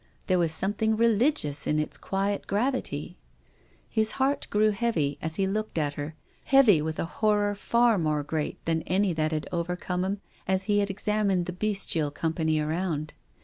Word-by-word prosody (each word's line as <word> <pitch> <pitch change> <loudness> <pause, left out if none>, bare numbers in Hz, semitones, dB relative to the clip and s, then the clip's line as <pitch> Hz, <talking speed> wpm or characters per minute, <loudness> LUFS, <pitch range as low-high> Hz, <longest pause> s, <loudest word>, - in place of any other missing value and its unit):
There 185 -1 +2
was 165 -2 +2
something 205 +6 +1
re 230 +1 +4
ligious 220 - +1
in 150 - +1
its 155 - -1
quiet 195 +1 -2
gravity. 205 - -2 0.7
His 220 0 +1
heart 275 +2 0
grew 215 +1 +3
heavy 195 -10 -1
as 160 0 -1
he 195 - +1
looked 215 0 -2
at 145 -2 0
her, 145 +1 -6 0.3
heavy 250 - +6
with 155 +1 -3
a - - -1
horror 205 +3 +1
far 235 +1 +2
more 155 -2 0
great 150 +1 -4
than 165 -1 +1
any 190 0 +2
that 155 0 0
had 155 -1 -2
overcome 180 +1 -2
him 195 +1 -2 0.3
as 190 0 +1
he 205 0 +2
examined 200 -2 0
the 180 - -4
bestial 185 -6 -1
company 160 +1 -1
around. 155 0 -2
190 Hz, 170 wpm, -27 LUFS, 160-210 Hz, 0.7 s, heavy